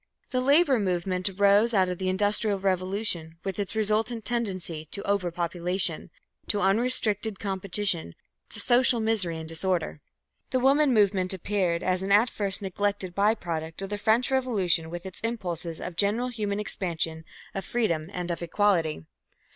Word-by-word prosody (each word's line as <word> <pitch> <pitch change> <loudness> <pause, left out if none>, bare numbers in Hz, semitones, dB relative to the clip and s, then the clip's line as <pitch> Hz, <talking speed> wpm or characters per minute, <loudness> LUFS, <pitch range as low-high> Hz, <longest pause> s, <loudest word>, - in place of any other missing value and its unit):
The 255 - +1
Labour 280 -1 +4
movement 185 -1 0
arose 205 +4 +3
out 190 -2 +4
of 180 -1 -4
the 185 -1 -1
Industrial 205 +2 +2
Revolution 185 -3 -1
with 195 +1 -4
its 200 +1 -3
resultant 220 +2 0
tendency 185 -9 -2
to 200 - -2
over 200 -3 0
population, 175 +2 -1 0.4
to 205 - +1
unrestricted 215 0 +2
competition, 190 - -2 0.3
to - - -4
social 245 -1 +3
misery 215 -7 +1
and 160 0 -7
disorder. 165 -2 -1 0.5
The 255 - +1
Woman 275 +2 +4
movement 195 -4 +2
appeared 185 -3 -1
as 185 0 0
an 195 +1 -2
at 215 +4 +5
first 200 -1 +1
neglected 195 -1 -2
by 205 +4 +3
product 165 -5 -5
of 195 - -6
the 205 - -3
French 230 +5 +2
Revolution 195 -11 +1
with 175 +2 -7
its 190 -2 -8
impulses 175 -8 -4
of 180 - -6
general 215 +7 +1
human 210 -4 -3
expansion, 165 -5 -2 0.3
of 195 - -4
freedom 175 -8 -1
and 180 -2 -4
of 170 - -4
equality. 170 - +1
195 Hz, 155 wpm, -27 LUFS, 175-215 Hz, 0.5 s, at